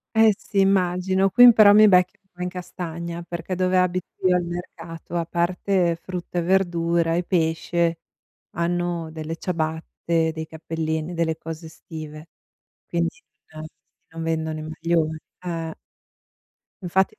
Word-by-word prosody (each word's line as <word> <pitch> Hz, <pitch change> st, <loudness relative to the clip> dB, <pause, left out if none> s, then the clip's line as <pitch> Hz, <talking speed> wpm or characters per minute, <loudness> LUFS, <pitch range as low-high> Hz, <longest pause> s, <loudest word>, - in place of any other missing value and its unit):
Eh 220 Hz, -1 st, +6 dB
sì 200 Hz, -, -3 dB
immagino. 190 Hz, 0 st, +2 dB
Qui 245 Hz, +6 st, +7 dB
m -, -, +11 dB
però 210 Hz, -2 st, +8 dB
mi 215 Hz, 0 st, +8 dB
becchi 180 Hz, -1 st, +4 dB, 0.2 s
a 180 Hz, -, -10 dB
in 180 Hz, -, -2 dB
castagna, 170 Hz, -1 st, -6 dB
perché 170 Hz, +1 st, -5 dB
dove 185 Hz, 0 st, +1 dB
abito 180 Hz, -1 st, +1 dB, 0.2 s
io, 180 Hz, -, +4 dB
al 175 Hz, -, +1 dB
mercato, 175 Hz, -1 st, -7 dB
a 170 Hz, -1 st, 0 dB
parte 175 Hz, +1 st, +1 dB
frutta 180 Hz, -1 st, -5 dB
e -, -, +1 dB
verdura 170 Hz, -2 st, +1 dB
e 175 Hz, -, 0 dB
pesce, 170 Hz, 0 st, 0 dB, 0.5 s
hanno 170 Hz, -1 st, -2 dB
delle 160 Hz, 0 st, -5 dB
ciabatte, 160 Hz, -1 st, -1 dB
dei 160 Hz, 0 st, -5 dB
cappellini, 160 Hz, +1 st, -3 dB
delle 165 Hz, -1 st, 0 dB
cose 165 Hz, 0 st, -7 dB
estive. 155 Hz, 0 st, -10 dB, 0.6 s
Quindi 170 Hz, -1 st, 0 dB, 0.4 s
non 155 Hz, 0 st, -7 dB, 0.4 s
non 165 Hz, 0 st, -6 dB
vendono 160 Hz, -1 st, -2 dB
i -, -, -6 dB
maglioni. 160 Hz, 0 st, -1 dB, 0.3 s
Eh. 165 Hz, -2 st, -4 dB, 1.0 s
Infatti 190 Hz, +4 st, +1 dB
170 Hz, 140 wpm, -23 LUFS, 160-180 Hz, 1.0 s, m